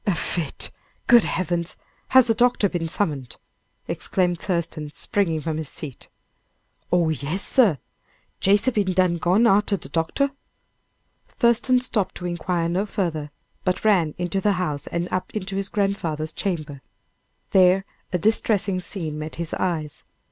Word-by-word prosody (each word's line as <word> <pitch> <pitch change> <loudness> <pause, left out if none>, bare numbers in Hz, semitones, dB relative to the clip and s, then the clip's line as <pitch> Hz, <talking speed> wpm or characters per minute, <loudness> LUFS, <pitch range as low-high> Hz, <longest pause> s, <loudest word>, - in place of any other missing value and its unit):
"A 195 - +3
fit! 160 +1 -2 0.3
good 240 -2 +6
heavens! 170 -1 -2 0.3
has 260 -2 +6
a 225 - +4
doctor 240 -2 +3
been 175 -3 -3
summoned?" 145 - -2 0.5
exclaimed 180 -2 0
Thurston, 170 -5 -2
springing 165 0 -1
from 160 0 -2
his 155 -3 -4
seat. 140 -5 -7 0.8
"Oh, 175 -2 +3
yes, 155 +6 -2
sir! 220 - +4 0.6
Jase 205 +4 +3
be 215 -5 +1
done 185 -2 +1
gone 185 +8 +3
arter 205 -2 +3
de - - -9
doctor." 170 - 0 1.0
Thurston 245 +1 +3
stopped 215 -6 -1
to 180 - -7
inquire 175 -1 -1
no 185 +5 0
farther, 160 -7 -2 0.3
but 185 +2 -1
ran 175 -8 +3
into 180 +2 -1
the 205 +1 +3
house 155 -7 -3
and 170 +1 -2
up 185 - -1
into 195 -2 -3
his 195 0 -2
grandfather's 170 -7 -1
chamber. 155 -8 -3 0.7
There 190 0 +5 0.3
a 180 - +1
distressing 200 -1 +1
scene 160 -6 -5
met 155 0 -6
his 170 -1 -5
eyes. 160 -5 -2
180 Hz, 145 wpm, -23 LUFS, 160-200 Hz, 1.0 s, good